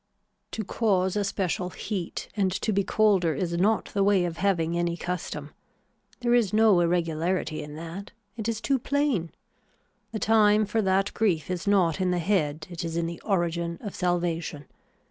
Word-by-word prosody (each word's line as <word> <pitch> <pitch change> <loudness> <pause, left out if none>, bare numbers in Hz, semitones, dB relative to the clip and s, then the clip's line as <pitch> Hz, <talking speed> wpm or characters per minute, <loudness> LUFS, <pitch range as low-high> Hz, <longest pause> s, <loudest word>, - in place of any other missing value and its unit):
To 220 - -2
cause 190 -3 +1
a 205 - +1
special 185 -2 -1
heat 185 -2 -5
and 195 -3 +1
to 210 +2 -1
be 200 0 +2
colder 190 -6 +2
is 170 +4 -2
not 200 +6 +1
the 200 - +2
way 195 -3 +3
of 170 -1 -4
having 170 -4 +1
any 170 0 0
custom. 160 -4 -4 0.7
There 240 -1 +2
is 235 -6 +3
no 215 -3 +5
irregularity 170 -1 0
in 150 0 -8
that. 170 +5 -7 0.3
It 225 -1 -3
is 220 -1 -2
too 270 +1 +1
plain. 265 - 0 0.8
The 225 - -3
time 215 -1 +4
for 220 +2 0
that 195 0 +1
grief 185 -6 0
is 180 +1 -4
not 190 -4 +3
in 185 - +2
the 180 - +1
head 160 -4 0
it 175 +1 -5
is 165 0 -3
in 170 - 0
the 170 0 -6
origin 170 -3 -1
of 205 -4 -6
salvation. 170 -4 -1
185 Hz, 175 wpm, -26 LUFS, 170-205 Hz, 0.8 s, no